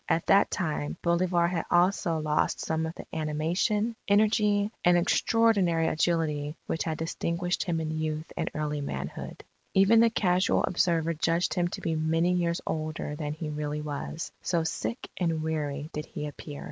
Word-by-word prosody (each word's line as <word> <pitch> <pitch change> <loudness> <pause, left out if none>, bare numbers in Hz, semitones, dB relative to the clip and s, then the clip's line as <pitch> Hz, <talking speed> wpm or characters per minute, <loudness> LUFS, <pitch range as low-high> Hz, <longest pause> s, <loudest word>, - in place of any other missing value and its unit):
At 165 - +1
that 200 +1 +5
time, 155 -5 -2
Bolivar 170 0 +2
had 170 -2 -2
also 175 -1 +2
lost 155 -1 0
some 160 0 -1
of 160 - -7
the - - -9
animation, 170 +9 0
energy, 210 0 +3
and 175 0 +5
extraordinary 180 -3 +3
agility 155 -2 0
which 165 - -2
had 160 -2 -2
distinguished 170 +3 -2
him 170 -3 0
in 155 -1 -2
youth 155 0 -3
and - - -1
early 150 -1 -2
manhood. 70 - -5 0.3
Even 195 +4 +6
the 230 0 +6
casual 185 -4 +2
observer 165 -2 +1
judged 165 +2 +1
him 175 -1 +1
to - - -6
be 165 -1 -1
many 165 +3 +2
years 170 -1 0
older 155 -1 -3
than 150 -1 -3
he 155 0 -5
really 150 0 -3
was, 150 +2 -5
so 170 -2 0
sick 230 +8 -3
and 165 -3 0
weary 150 -1 -3
did 150 0 -4
he 150 - -5
appear.... 145 0 -8
165 Hz, 165 wpm, -28 LUFS, 155-180 Hz, 0.3 s, Even